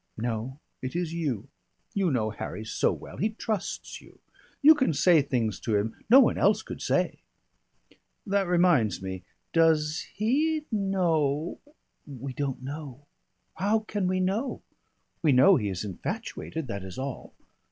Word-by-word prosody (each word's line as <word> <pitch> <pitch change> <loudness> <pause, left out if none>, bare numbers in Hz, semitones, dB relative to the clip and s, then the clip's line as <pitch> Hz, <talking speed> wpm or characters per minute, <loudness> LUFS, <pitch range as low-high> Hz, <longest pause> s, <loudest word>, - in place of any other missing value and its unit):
No, 115 +3 -3 0.2
it 130 +4 -5
is 175 -2 -2
you. 145 -11 -2 0.5
You 195 -3 +1
know 110 -6 0
Harry 110 0 -6
so - - +1
well. - - -8
He 215 - +1
trusts 215 -2 -4
you. - - -18 0.5
You 310 +2 +10
can 265 - +1
say 170 0 +5
things 115 -8 -1
to 110 - -1
him 105 +2 0
no 255 +4 +9
one 260 - +4
else 210 +2 +3
could - - -8
say." - - 0 1.1
"That 200 -2 +1
reminds 170 - +3
me. 95 -1 -5 0.3
Does 160 -1 +2
he 300 +9 +1
know 170 -7 0 0.3
" - - -49
"We 135 -1 -7
don't 135 -1 -3
know. 145 -1 -7 0.5
How 205 +5 +2
can 205 -3 -2
we 185 0 +1
know? 200 +8 -1 0.6
We 155 -5 +4
know 130 +10 +7
he 105 -4 -1
is 95 +2 -4
infatuated, 160 - -5
that 100 -6 -5
is 95 -1 -8
all. 135 -1 -6
155 Hz, 150 wpm, -27 LUFS, 125-195 Hz, 1.1 s, You